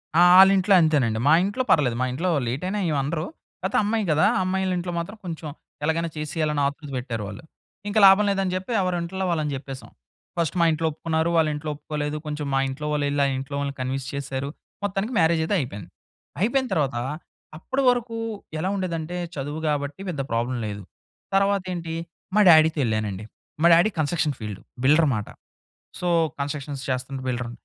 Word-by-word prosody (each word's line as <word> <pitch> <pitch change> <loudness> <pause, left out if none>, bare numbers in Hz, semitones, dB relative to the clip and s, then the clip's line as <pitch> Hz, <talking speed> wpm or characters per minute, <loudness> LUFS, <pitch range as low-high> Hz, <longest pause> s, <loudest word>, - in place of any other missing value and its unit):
ఆ! 170 - +6 0.2
ఆళింట్లో 195 0 +6
అంతేనండి. 135 -9 +2
మా 145 - +7
ఇంట్లో 205 +7 -1
పర్వాలేదు. 130 -6 +3
మా - - +2
ఇంట్లో 170 +9 -1 0.2
లేట్ 130 +7 -3
అయినా 205 +2 -2
ఏమనరు. 155 +2 -1 0.4
కాపోతే - - 0
అమ్మాయి 215 +1 0
కదా! 155 +5 +4
ఆ - - +2
అమ్మాయిల 190 0 0
ఇంట్లో 175 0 -3
మాత్రం 195 +6 -6
కొంచెం 165 -2 -5 0.4
ఎలాగైనా 165 +2 0
చేసేయాలి 150 0 -1
ఆతృత 145 +1 -4
పెట్టారు 120 -4 -4
వాళ్ళు. 100 +9 -9 0.4
ఇంకా 205 +1 +1
లాభం 195 +2 +6
లేదని 195 -2 0
చెప్పి 185 +5 -4
ఎవరింట్లో 180 +1 -2
వాళ్ళని 155 -3 -1
చెప్పేసాం. 135 -3 -8 0.5
ఫస్ట్ 170 +1 0
మా 170 - +5
ఇంట్లో 160 +1 0
ఒప్పుకున్నారు, 160 +1 -1
వాళ్ళ 160 -1 +4
ఇంట్లో 150 +1 -5
ఒప్పుకోలేదు 150 0 -4
కొంచెం 150 0 -4
మా 135 - +3
ఇంట్లో 140 +3 -5
వాళ్ళు 145 -1 0
ఎళ్లి 145 0 0
ఆ - - +2
ఇంట్లో 135 +2 -5
వాళ్ళని 140 -1 -3
కన్విన్స్ 130 +1 -3
చేసారు. 140 0 -3 0.3
మొత్తానికి 205 +4 -2
మ్యారేజ్ 165 0 +3
అయితే 185 +6 0
అయిపోయింది. 105 - -6 0.5
అయిపోయిన 255 +5 +2
తర్వాత 140 -5 0 0.6
అప్పటివరకు 245 +3 +1 0.4
ఎలా 180 +4 -1
ఉండేదంటే 175 -3 -3 0.2
చదువు 145 +2 -4
కాబట్టి 145 +2 -2
పెద్ద 150 -6 -2
ప్రాబ్లమ్ 120 +2 -1
లేదు. 105 -1 -5 0.5
తరువాతేంటి 185 -4 0 0.4
మా 210 - +6
డ్యాడీ‌తో 160 -1 +6
ఎళ్ళానండి. 110 -3 -2 0.4
మా - - +7
డ్యాడీ 170 +5 +5
కంస్ట్రక్షన్ 155 0 +1
ఫీల్డ్ 105 -3 -6 0.2
బిల్డర్ 155 +4 +5
అన్నమాట. 110 -6 -1 0.7
సో, 180 - -1 0.3
కంస్ట్రక్షన్స్ 140 -1 -4
చేస్తున్న 130 +1 -3
బిల్డర్. 125 -1 -2
155 Hz, 165 wpm, -24 LUFS, 135-180 Hz, 0.7 s, మా